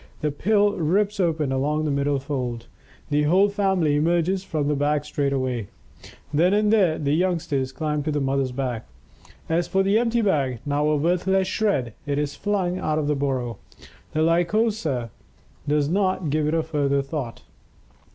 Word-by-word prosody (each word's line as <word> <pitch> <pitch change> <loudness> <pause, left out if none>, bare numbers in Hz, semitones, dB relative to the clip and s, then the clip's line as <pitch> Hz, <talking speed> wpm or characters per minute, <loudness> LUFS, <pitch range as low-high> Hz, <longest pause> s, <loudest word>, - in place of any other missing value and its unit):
The 150 -1 0
pill 205 +6 +2
rips 200 +6 +1
open 160 -6 +1
along 150 +4 0
the 150 - 0
middle 140 0 +1
fold. 130 -4 -4 0.5
The 145 +1 +3
whole 190 +6 +4
family 190 -7 +1
emerges 175 +4 +1
from 155 -6 -2
the 150 - +2
bag 145 +1 0
straightway. 130 -6 -1 0.7
Then 175 +6 +3
and 210 +1 +3
there, 185 -7 +3
the 145 -1 0
youngsters 155 -6 0
climb 150 +1 -2
to 155 +2 -2
the 145 - 0
mother's 135 -1 0
back. 125 - -3 0.6
As 165 +1 0
for 195 0 +2
the 200 +3 +3
empty 235 0 +1
bag, 140 - +1
now 145 +1 +1
a 155 - +2
worthless 180 +4 +1
shred, 190 - 0
it 140 -1 0
is 145 -1 -1
flung 190 -3 -1
out 155 0 -1
of 155 - 0
the 150 0 +1
burrow; 130 -5 -2 0.5
the 155 - +1
Lycosa 170 - +1 0.6
does 145 -1 +2
not 185 -2 0
give 155 0 +1
it 155 - +1
a 165 - +1
further 140 -3 0
thought. 135 -5 -5
150 Hz, 170 wpm, -24 LUFS, 140-185 Hz, 0.7 s, whole